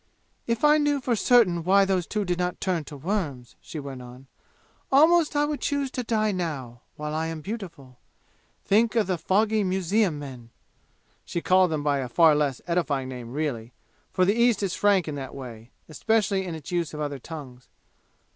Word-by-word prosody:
"If 230 +2 -1
I 300 +1 +6
knew 290 -1 +1
for 250 -2 0
certain 205 -7 +3
why 195 +3 +4
those 185 -3 0
two 210 -2 -2
did 180 -1 -1
not 180 0 -2
turn 180 -5 -1
to 145 - -9
worms," 145 - -3
she 155 - -7
went 135 -3 -7
on, 125 +2 -12 0.7
"almost 315 +3 +5
I 290 0 +3
would 295 -1 -3
choose 280 -2 -1
to 255 - -3
die 215 -2 +1
now, 140 -10 -4
while 150 0 -5
I 160 +1 -1
am 160 -1 -5
beautiful! 165 - -8 0.7
Think 220 +4 +3
of 225 -3 +3
the 180 -2 -2
fogy 215 +4 +2
museum 190 -1 +1
men!" 130 -5 -9 0.7
(She - - -3
called 185 +1 +4
them 155 -2 -2
by 145 -1 +1
a 130 -2 -4
far 160 +4 +5
less 145 -4 -1
edifying 150 -7 -1
name, 125 -2 -8
really, 130 -5 -3 0.4
for 185 - +2
the 200 - +3
East 235 -3 +2
is 190 -2 -1
frank 200 -5 +2
in 155 - -3
that 135 -2 -7
way, 120 -4 -9 0.2
especially 205 +3 0
in 170 - -4
its 155 0 -9
use 170 -3 -2
of - - -6
other 145 -2 -3
tongues.) 130 -4 -10
175 Hz, 190 wpm, -25 LUFS, 140-210 Hz, 0.7 s, I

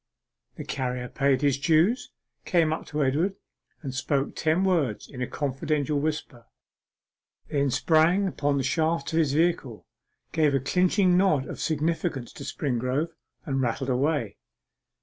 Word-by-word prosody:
The - - -6
carrier 125 -2 -3
paid 135 +1 +1
his 140 -1 +2
dues, 170 - +2 0.3
came 165 -3 +2
up - - -6
to 150 -1 -1
Edward, 160 +9 +1 0.5
and 135 -3 -4
spoke 135 +1 -1
ten 160 +4 +1
words 160 - 0
in 130 -3 -9
a 125 - -1
confidential 145 +1 -1
whisper: 150 -5 -4 1.0
then 140 -1 +1
sprang 165 +8 +3
upon 145 -5 0
the 135 - 0
shafts 160 +2 0
of 165 - +3
his 150 -4 +2
vehicle, 155 -8 0 0.5
gave 155 -3 +2
a - - +3
clinching 180 - +2
nod 180 -8 +3
of - - -7
significance 160 -4 -1
to - - -9
Springrove, 130 +4 -1 0.3
and 135 -4 -1
rattled 130 +2 -1
away. 130 -3 0
145 Hz, 145 wpm, -26 LUFS, 135-165 Hz, 1.0 s, sprang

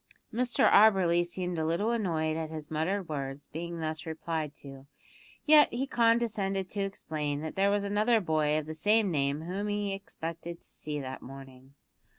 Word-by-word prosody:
Mr 245 +2 +3
Auberly 190 -5 +5
seemed 180 -1 -3
a - - 0
little 170 +8 +1
annoyed 165 -9 0
at 160 -1 -3
his 155 -1 -7
muttered 180 +5 -1
words 140 -2 -4
being 170 +1 -5
thus 160 +1 -4
replied 160 -1 -3
to, 135 -1 -12 0.6
yet 300 -1 +7
he 250 +3 -1
condescended 230 -6 +1
to 205 - -2
explain 155 -7 -3
that 160 0 -5
there 195 +1 +3
was 205 0 +1
another 210 +3 +2
boy 155 -4 +1
of 155 - -2
the 155 - -6
same 205 +5 +2
name 140 -1 0
whom 190 +5 -3
he 205 -1 -1
expected 170 -3 -6
to - - -24
see 150 -1 -5
that 130 -1 -6
morning. 135 0 -12
170 Hz, 170 wpm, -30 LUFS, 155-200 Hz, 0.6 s, yet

